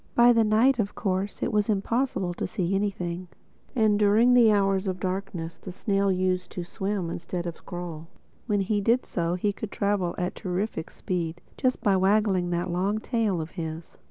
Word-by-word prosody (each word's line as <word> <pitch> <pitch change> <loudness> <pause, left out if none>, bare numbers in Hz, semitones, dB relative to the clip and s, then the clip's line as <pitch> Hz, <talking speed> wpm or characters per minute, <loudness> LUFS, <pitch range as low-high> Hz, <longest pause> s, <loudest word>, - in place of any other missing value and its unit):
By 240 0 +7
night 230 +3 +4
of 205 -2 -1
course 195 -1 -2
it 240 - -1
was 210 +1 +2
impossible 210 -2 0
to - - -3
see 190 -4 -1
anything; 185 -3 -2 0.5
and 215 -3 +3
during 215 +4 +5
the 235 -3 +6
hours 195 -1 +2
of 185 -1 -2
darkness 185 -3 -4
the 185 - -8
snail 195 +1 +1
used 185 0 0
to 180 - -4
swim 190 -1 -3
instead 175 +1 -4
of 170 -2 -7
crawl. 170 -3 -6 0.4
When 205 -3 +2
he 205 +2 0
did 235 +5 +2
so 170 0 -1
he 200 +3 0
could 210 +1 -6
travel 200 -4 0
at 180 0 -1
a - - -14
terrific 185 -2 -2
speed, 170 -2 -3 0.2
just 255 -2 0
by 200 -2 +4
waggling 190 -2 +2
that 175 +1 -1
long 190 +4 0
tail 220 -5 0
of 160 +1 -5
his. 160 -2 -6
195 Hz, 185 wpm, -26 LUFS, 175-210 Hz, 0.5 s, By